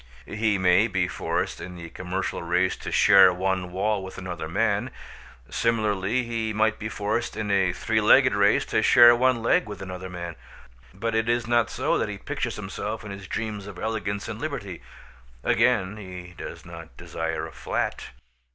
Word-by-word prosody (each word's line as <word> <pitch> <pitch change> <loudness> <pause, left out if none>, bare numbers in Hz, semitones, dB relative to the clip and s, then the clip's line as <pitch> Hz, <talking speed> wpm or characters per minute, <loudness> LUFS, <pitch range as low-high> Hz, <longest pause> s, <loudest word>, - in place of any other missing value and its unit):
He 110 -1 0
may 95 +3 +4
be 95 -5 0
forced - - -2
in 90 0 -8
the 85 -1 -9
commercial 95 +1 -4
race 90 +2 +1
to - - -7
share 95 -1 +7
one 95 0 -2
wall 100 +2 0
with 95 - -9
another 90 -4 -5
man. 100 +2 0 0.6
Similarly 110 0 0
he 115 -2 -2
might 110 +1 +1
be 110 - -4
forced 105 +3 -2
in 105 -2 -2
a 95 -2 +3
three - - 0
legged - - +5
race - - +3
to - - +1
share 120 0 +8
one 125 -1 +2
leg 115 - +2
with 100 -2 -7
another 95 -1 -7
man; 85 -2 -7 0.5
but 110 +4 -3
it 110 +1 +1
is 120 0 +1
not 120 0 +2
so - - 0
that - - -1
he - - -5
pictures - - -4
himself 110 +1 -5
in 100 - -7
his 100 -1 -8
dreams 105 0 -4
of 100 -3 -9
elegance 100 -1 -3
and 110 +2 -6
liberty. 110 - -5 0.6
Again, 95 +2 +2
he 90 -3 -9
does - - -9
not 85 -7 -11
desire 80 -1 -4
a - - -9
flat. - - -3
100 Hz, 180 wpm, -25 LUFS, 90-110 Hz, 0.6 s, share